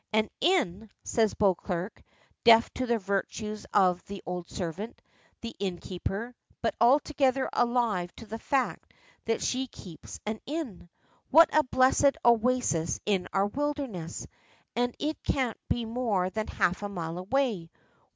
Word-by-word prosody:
"An 215 0 +2
inn," 225 - +1
says 220 -3 +1
Beauclerk, 185 -1 0 0.4
deaf 230 -1 +7
to 255 - -2
the 235 -1 +2
virtues 210 +1 -3
of 185 -3 +3
the 200 -1 -7
old 180 -1 -5
servant, 190 +5 -5 0.4
the 230 0 -6
innkeeper, 195 +4 -4 0.3
but 230 - +1
altogether 270 +1 +3
alive 235 -8 +1
to 230 - -10
the 225 +1 -6
fact 270 +1 -1 0.3
that 225 0 0
she 260 +1 0
keeps 180 -8 -11
an 215 +1 -3
inn. 270 - -5 0.4
"What 325 +3 +7
a 310 - +7
blessed 265 +1 +3
oasis 235 -8 +2
in 195 -3 +1
our 195 0 +2
wilderness! 265 - -3 0.5
And 245 0 0
it 305 +1 -3
can't 255 -5 0
be 240 -1 0
more 220 -6 0
than 215 +1 -2
half 180 +3 0
a 205 - -3
mile 170 -3 -4
away. 210 -4 0
220 Hz, 140 wpm, -29 LUFS, 190-255 Hz, 0.5 s, deaf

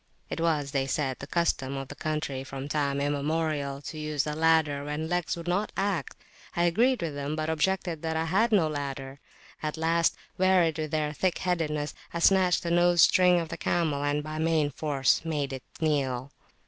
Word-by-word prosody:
It - - -3
was, 150 -4 +1
they 135 -1 0
said, 135 -1 -1
the - - -7
custom 140 -6 0
of 135 -1 -5
the - - -6
country 150 -4 -3
from 135 0 -6
time 140 -2 0
immemorial 145 0 -1
to 155 - -6
use 150 -2 -1
a 150 - -2
ladder 160 -2 +2
when 150 +2 -3
legs 175 0 -1
would 170 0 -8
not 195 +4 0
act. 195 -7 -1 0.4
I 170 - +2
agreed 230 +6 +2
with 160 -3 -2
them, 145 +1 -3
but 155 0 -1
objected 170 0 0
that 160 -1 -2
I 160 - 0
had 195 +8 +2
no 190 -7 +4
ladder. 140 -2 -5 0.4
At 155 +1 -3
last, 165 +1 +2 0.2
wearied 180 -4 +3
with 155 -1 -2
their 150 -1 -1
thick 180 +3 0
headedness, 155 -5 -1 0.2
I - - -4
snatched 180 +1 +4
the 170 - -2
nose 175 -1 +5
string 180 -1 +5
of 165 -1 -4
the 165 - -5
camel, 155 -4 0
and 145 +1 0
by 155 +1 -5
main 160 -2 +2
force 140 -1 +1
made 150 -4 -2
it 130 - -5 0.2
kneel. 140 -4 0
155 Hz, 195 wpm, -28 LUFS, 145-170 Hz, 0.4 s, nose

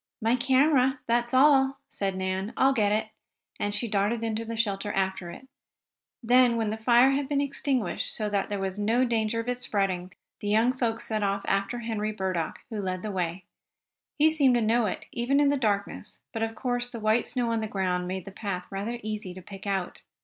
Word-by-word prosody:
"My 225 +2 +2
camera 265 +1 +3
that's 240 +1 +1
all," 270 0 +5
said 195 -1 -2
Nan. 190 +3 -2
"I'll 270 +1 +4
get 210 -5 +2
it," 215 +1 0 0.5
and 205 0 -1
she 235 +3 -1
darted 210 +2 0
into 225 0 -1
the 230 0 -5
shelter 205 -2 -1
after 190 -2 -1
it. 220 +10 -11 0.8
Then, 245 0 +5
when 220 -2 0
the 220 - -3
fire 240 +4 +5
had 275 0 -1
been 285 -1 +1
extinguished 275 -3 -1
so 215 - -2
there 205 0 -1
would 190 -1 -2
be - - -3
no 235 +5 +2
danger 230 -1 0
of 230 - -10
it 250 0 -2
spreading, 190 -5 -1 0.3
the 205 - -5
young 220 +4 +3
folks 230 -3 -1
set 215 -1 -2
off 200 0 0
after 200 +5 -1
Henry 215 -2 -2
Burdock, 185 -5 -3
who 215 -2 -3
led 185 -1 -3
the 215 - -3
way. 180 -1 -3 0.7
He 310 +1 +5
seemed 280 -5 +4
to 240 - +2
know 225 +1 +2
it, - - -4
even 250 +4 +1
in 290 -1 +4
the 285 - +2
darkness, 210 -5 -2
but 225 - -3
of 225 0 -2
course 245 0 -1
the 235 - -7
white 220 +2 +2
snow 245 -2 -1
on 225 -1 0
the 220 - -2
ground 180 -3 -1
made 185 -1 -4
the 195 - -8
path 195 -3 -4
rather 205 +5 -3
easy 210 -4 -5
to 185 - -9
pick 195 +2 -9
out. 195 -2 -2
220 Hz, 210 wpm, -27 LUFS, 195-245 Hz, 0.8 s, all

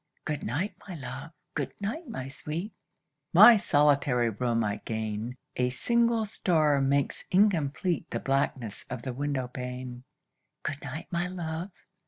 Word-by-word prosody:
Good 150 -2 -2
night, 160 - -1
my 185 - -6
love! 135 0 -7 0.2
good - - -3
night, 275 - -3
my 175 - -5
sweet! 160 +8 -5 0.6
My 240 - +10
solitary 140 - +3
room 115 +1 0
I 105 -1 -1
gain. 110 +1 -3 0.2
A 125 0 +2
single 235 - +2
star 155 -8 +2
makes 140 0 +1
incomplete 180 -4 +2
The - - -2
blackness 135 -5 -1
of 125 -2 -5
the 130 - -3
window 135 -1 -1
pane. 125 0 -6 0.6
Good 145 -2 -3
night, 145 +6 -6
my 175 0 0
love! 170 0 -4
140 Hz, 140 wpm, -29 LUFS, 125-175 Hz, 0.6 s, My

